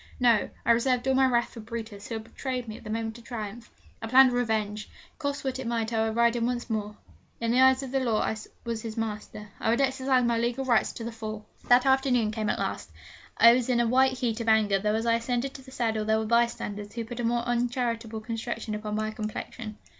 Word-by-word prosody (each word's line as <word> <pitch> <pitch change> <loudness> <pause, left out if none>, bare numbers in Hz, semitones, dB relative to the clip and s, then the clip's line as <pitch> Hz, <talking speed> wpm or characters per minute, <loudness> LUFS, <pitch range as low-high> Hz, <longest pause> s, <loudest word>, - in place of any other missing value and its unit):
No: 235 -4 +3 0.2
I - - +5
reserved 250 +2 +2
all 265 - +3
my 265 0 +4
wrath 240 -2 +1
for 235 - -9
Brutus, 220 -2 -7
who 230 - -4
had 220 - -5
betrayed 250 +1 -5
me 215 - -6
at - - -12
the 215 - -8
moment 225 +1 -3
of - - -16
triumph. 230 0 -7 0.3
I 225 - -4
planned 260 +2 +7
revenge. 215 -3 -1 0.3
Cost 285 -1 -2
what 265 -1 -2
it 260 - -4
might 230 -1 -1
I 225 0 +2
would 220 - -3
ride 235 0 +3
him 235 0 0
once 245 -1 -3
more. 210 -1 -3 0.4
In 230 0 0
the 250 +2 +4
eyes 260 +1 +5
of 260 - -6
the 270 - +1
law 235 -4 +1
I - - 0 0.3
was 230 -2 -3
his 225 0 -6
master. 210 -1 -5
I - - 0
would 235 - +2
exercise 265 -1 +2
my 235 -1 +1
legal 240 +3 -1
rights 235 -4 +3
to 230 - -7
the 235 - -4
full. 215 -1 -6 0.2
The 250 +2 +5
afternoon 260 -5 +3
came 215 -1 -2
at - - 0
last. - - -3 0.5
I 230 0 +8
was 250 0 0
in 245 -1 +3
a 240 - +3
white 260 +3 +4
heat 240 -3 -2
of 230 - -1
anger, 210 -3 +4
though 210 +2 0
as 225 +1 -1
I 230 - +3
ascended 245 +3 -2
to 270 - -10
the 260 - -14
saddle 225 -4 -1
there 220 +1 +2
were 220 - -1
bystanders 210 -3 0
who 230 -1 -4
put 240 +1 -7
a - - -1
more 235 +1 +1
uncharitable 235 -2 -1
construction 225 0 -4
upon 210 0 -3
my 215 0 -1
complexion. 215 +1 -6
235 Hz, 245 wpm, -27 LUFS, 220-250 Hz, 0.5 s, I